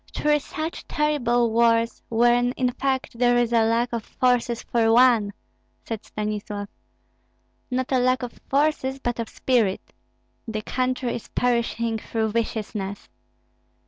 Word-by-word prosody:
"Three 295 0 +2
such 310 +3 -6
terrible 245 -6 +1
wars, 230 0 +2
when 240 +2 +3
in 250 -1 0
fact 265 -2 -2
there 245 -1 +4
is 240 -1 +1
a 230 -1 +5
lack 230 +2 +1
of 230 -2 -2
forces 245 -1 0
for 225 -2 +2
one," 235 -4 +5 0.5
said 225 -2 -5
Stanislav. 210 -1 -4 1.0
"Not 255 0 -2
a 260 - +3
lack 255 +1 +2
of 245 - -5 0.2
forces, 275 -2 +1
but 240 -3 -3
of 230 - -3
spirit. 230 -7 0 0.5
The 215 -1 -4
country 255 0 -1
is 235 - -6
perishing 235 -2 0
through 220 0 -2
viciousness. 210 -3 -3
240 Hz, 135 wpm, -24 LUFS, 225-255 Hz, 1.0 s, a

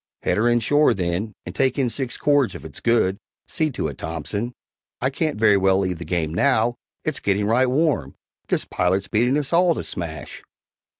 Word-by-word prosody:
"Head - - +1
her 110 +3 +2
in 120 0 +3
shore, 145 +5 +3
then, 95 +3 -2
and 90 - -6
take 135 +6 +1
in 130 -4 +1
six 130 -3 -2
cords 145 -4 +2
if - - -9
it's - - -7
good 110 -5 +2 0.3
see 155 -1 0
to - - -2
it, - - -8
Thompson; 85 +9 -4 0.5
I 130 +2 0
can't 155 +2 -1
very 105 -2 +5
well 95 0 +3
leave 90 -3 -1
the 85 - -6
game 80 -3 -1
now 120 +2 +2 0.3
it's 155 -3 -1
getting 100 +1 0
right 120 +5 +3
warm! 135 - 0 0.3
This - - 0
pilot's 95 +2 0
beating 120 +6 +2
us 150 +1 -2
all 175 -1 +4
to - - -4
smash." 80 -3 -6
110 Hz, 195 wpm, -22 LUFS, 95-135 Hz, 0.5 s, very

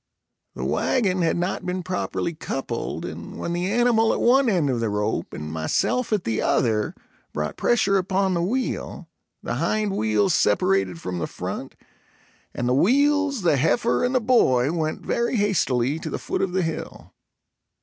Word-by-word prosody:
The - - -4
wagon 190 -7 +1
had 165 0 +1
not 175 +2 -2
been 180 0 -3
properly 180 -1 -2
coupled, 135 -6 -4
and - - -8
when 170 - -3
the 180 +3 -1
animal 230 -1 +3
at - - -1
one 260 +1 +4
end 175 -8 +2
of 120 - -1
the 115 -1 0
rope 105 +1 -2
and 75 0 -6
myself 80 - 0
at 210 -4 +1
the 110 -1 -1
other 110 -4 +1 0.4
brought 75 0 -3
pressure 200 -4 +2
upon 190 +1 0
the 170 - 0
wheel, 245 +9 -3 0.4
the - - -3
hind 210 -2 0
wheels 110 - +2
separated 95 -3 +2
from 90 0 -4
the 80 - -2
front, - - -6 0.8
and 120 - -3
the 125 - +2
wheels, 280 - +2
the 165 -5 +3
heifer 230 - +1
and 250 +1 0
the - - +5
boy, 150 - +3
went 160 -2 -3
very 235 +2 0
hastily 155 - +1
to - - -5
the - - -3
foot - - -3
of 190 - 0
the 185 -1 +1
hill. 165 -1 -6
175 Hz, 170 wpm, -24 LUFS, -, 0.8 s, the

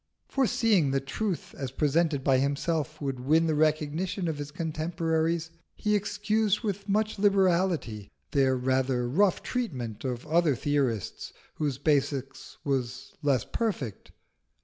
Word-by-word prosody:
Foreseeing 230 - +2
that 135 0 -1
truth 190 +5 -3
as 135 -2 -4
presented 150 +1 +1
by 135 -2 +4
himself 150 +3 -1
would 135 -3 -3
win 155 +6 +3
the 160 - +1
recognition 155 +4 0
of 155 -3 -2
his 145 0 -4
contemporaries, 160 +1 -1 0.2
he 210 0 +1
excused 210 +1 +1
with 200 -2 -3
much 215 +1 +1
liberality 185 - +2 0.2
their 135 -2 +3
rather 130 -1 +1
rough 185 +9 +2
treatment 125 - -3
of 125 -1 -3
other 160 -2 +3
theorists 130 -7 -1 0.2
whose 145 -4 -1
basis 135 -2 -1
was 130 -2 -2
less 140 -6 +2
perfect. 170 - -3
155 Hz, 125 wpm, -28 LUFS, 135-185 Hz, 0.2 s, by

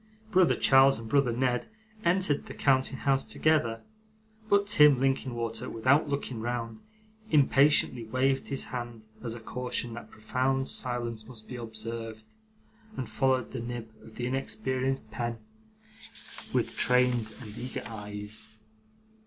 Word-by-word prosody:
Brother 185 -3 +5
Charles 135 0 +6
and 115 0 -8
brother 140 0 +3
Ned 125 +1 0 0.4
entered 170 -4 +1
the - - -8
counting 130 -1 +2
house 135 0 +1
together; 130 -8 +1 0.7
but 200 0 +4
Tim 150 -9 +6
Linkinwater, 125 -3 -1
without 130 +6 +2
looking 135 -5 -3
round, 115 -1 -3 0.5
impatiently 140 -4 +4
waved 130 +4 +1
his 135 - -2
hand 120 -3 -6 0.2
as 115 -1 -4
a - - -8
caution 125 0 -3
that 120 - -9
profound 130 +4 -1
silence 120 -3 -2
must 115 -3 -12
be 125 - -7
observed, 115 -1 -6 0.7
and 130 - -3
followed 130 +3 +1
the - - -4
nib 120 -1 -6
of 110 - -14
the 120 - -3
inexperienced 130 0 -2
pen 120 0 -3 1.1
with - - 0
strained 125 -3 +3
and 110 -4 -10
eager 125 +2 -5
eyes. 105 -1 -7
125 Hz, 130 wpm, -29 LUFS, 115-135 Hz, 1.1 s, Charles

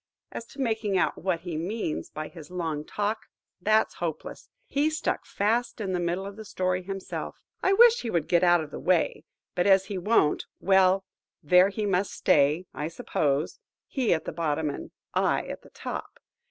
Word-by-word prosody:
As 230 - -7
to 275 - -15
making 220 -6 0
out - - +1
what 180 -1 0
he 170 -3 -4
means 175 0 -3
by 155 0 -5
his 160 -4 -12
long 165 -4 -3
talk, 210 +6 -3 0.3
that's 215 +3 +3
hopeless. - - -5 0.2
He 290 +2 +1
stuck 315 +1 -2
fast 230 +5 0
in 195 -3 -2
the 180 - 0
middle 175 +2 -1
of 200 +1 -8
the 220 - -7
story 185 -2 -1
himself. 195 +1 -5 0.3
I 385 - +3
wish 470 +3 +7
he 235 - -4
would 170 -7 0
get 175 0 +3
out 175 -1 +5
of 150 - -10
the - - -6
way; 175 -3 +1 0.3
but 180 - +1
as 195 -1 +5
he 195 -1 -4
won't,–well,–there 190 -1 +2
he 210 +1 -3
must 195 0 0
stay, 150 +5 +3
I 150 - -3
suppose–he 160 - -2
at 160 - +1
the - - -3
bottom, 155 -2 -1
and - - -7 0.2
I - - +2
at - - -7
the - - -17
top. - - -6
185 Hz, 180 wpm, -27 LUFS, 165-210 Hz, 0.3 s, wish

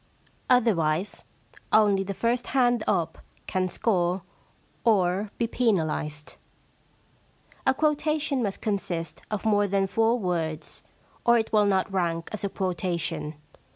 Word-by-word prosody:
Otherwise, 195 -8 +2 0.5
only 205 -3 +5
the 195 0 -4
first 235 +3 0
hand 245 -3 +3
up 165 -1 0 0.3
can 185 0 -1
score 180 -3 0 0.6
or 200 -2 +2
be 235 - +1
penalised. 160 -10 -1 0.6
* - - -18
A 265 - +4
quotation 300 -2 +1
must 200 -4 -2
consist 185 -5 -3
of 210 -1 -3
more 205 -2 +3
than 195 0 +1
four 225 +4 +2
words, 170 -6 -3 0.4
or 235 0 +5
it 225 -1 -2
will 210 -1 +5
not 195 0 +1
rank 170 -3 -1
as 215 - -5
a 200 - 0
quota 180 -2 -2
tion. 155 -1 -3
195 Hz, 130 wpm, -26 LUFS, 175-230 Hz, 0.6 s, only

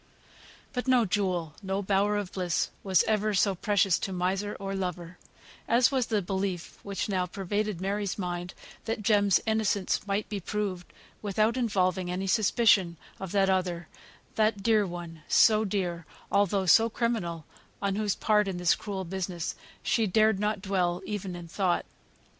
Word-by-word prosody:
But 250 0 -3
no 250 -3 +4
jewel, 180 -5 -1
no 195 0 -2
bower 200 +2 +2
of 200 -2 -4
bliss 180 -4 -1
was 190 -3 +3
ever 215 -1 +1
so 195 +1 +3
precious 195 -1 +2
to 195 - -3
miser 190 +3 -1
or 195 0 -4
lover 180 -2 -4 0.5
as 235 +3 +4
was 260 -4 +1
the 210 -3 0
belief 190 -1 -3
which 200 -1 -3
now 185 -3 0
pervaded 205 +1 -2
Mary's 200 +1 -2
mind, 175 -2 -4 0.3
that 225 -1 -3
Jem's 205 -3 +4
innocence 215 -3 0
might 200 +1 -1
be 205 - -4
proved, 190 -2 -4 0.3
without 215 +3 +1
involving 185 -7 0
any 185 +2 -2
suspicion 200 -4 +3 0.2
of 190 -2 -6
that 195 -1 +3
other 180 -3 -1 0.4
that 215 -2 +1
dear 215 -2 +3
one, 170 -2 -8
so 215 -1 +5
dear, 180 -5 -2 0.2
although 200 -1 +2
so 225 +6 +6
criminal 210 -9 -2 0.3
on 200 -1 -1
whose 210 -1 0
part 210 -1 +2
in 190 -2 -3
this 180 -1 +3
cruel 195 -3 -5
business 180 -1 -3 0.3
she 225 -2 +1
dared 215 +1 +3
not 210 -1 -1
dwell 185 -2 0
even 195 -3 -4
in 175 -1 -8
thought. 180 +1 0
195 Hz, 160 wpm, -28 LUFS, 180-210 Hz, 0.5 s, so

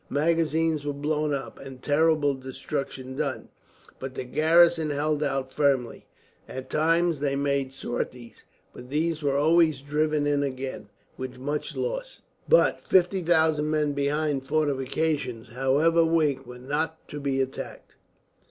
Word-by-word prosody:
Magazines 160 0 +1
were 145 0 -2
blown 150 +1 -1
up, 140 -1 -4
and 135 -1 -10
terrible 150 -1 +3
destruction 130 0 -5
done, - - -3 0.5
but 130 0 -6
the - - -3
garrison 165 +4 +4
held 150 +1 0
out 135 -2 -2
firmly. 135 -5 0 0.4
At 130 0 -7
times 165 0 +2
they 140 -1 0
made 140 -1 0
sorties, 120 -2 -5 0.3
but 125 - -11
these 160 +2 0
were 140 -1 +1
always 160 0 +4
driven 150 +1 0
in 145 -1 +2
again, 135 -1 -4 0.3
with 130 -1 -6
much 145 +4 -3
loss. - - -4 0.3
But - - +4
50,000 165 -4 +2
men 150 -1 +1
behind 145 0 0
fortifications, 140 -4 -1
however 140 +7 +3
weak, 150 -5 +1
were 125 0 -9
not 150 +5 -3
to 145 - -6
be 140 -1 -1
attacked. 135 0 -5
145 Hz, 135 wpm, -26 LUFS, 135-160 Hz, 0.5 s, garrison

